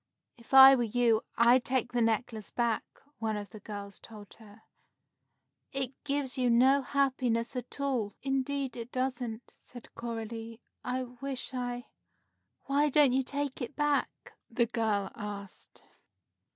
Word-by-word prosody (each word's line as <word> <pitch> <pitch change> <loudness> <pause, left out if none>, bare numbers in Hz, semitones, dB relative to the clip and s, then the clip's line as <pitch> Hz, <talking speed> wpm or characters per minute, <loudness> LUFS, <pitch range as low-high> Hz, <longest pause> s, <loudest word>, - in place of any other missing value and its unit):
"If 235 -1 -19
I 270 0 +11
were 255 - +2
you, 230 -1 +2 0.2
I'd 240 +2 +5
take 250 -1 0
the 245 -1 0
necklace 225 -1 -1
back," 235 -2 0 0.4
one 220 -1 -1
of 205 -3 -7
the 215 - -10
girls 205 -2 -8
told 210 -3 -12
her. 220 0 -16 1.1
"It 265 -2 -2
gives 280 -2 -2
you 250 -1 +2
no 260 +4 +5
happiness 255 -4 0
at 250 +2 -6
all." 255 -7 -1
"Indeed 270 -1 -1
it 235 0 -7
doesn't," 250 -3 -3
said 245 -2 -13
Coralie, 230 -1 -6 0.2
"I 255 +1 -2
wish 255 +2 -5
I 245 -1 -3 0.4
" - - -48
"Why 290 +2 +2
don't 285 -2 +5
you 265 - +3
take 280 +1 -3
it 250 +4 -5
back?" 295 -1 +1 0.4
the 235 0 +2
girl 220 -4 -1
asked. 205 -3 -8
245 Hz, 145 wpm, -30 LUFS, 225-265 Hz, 1.1 s, I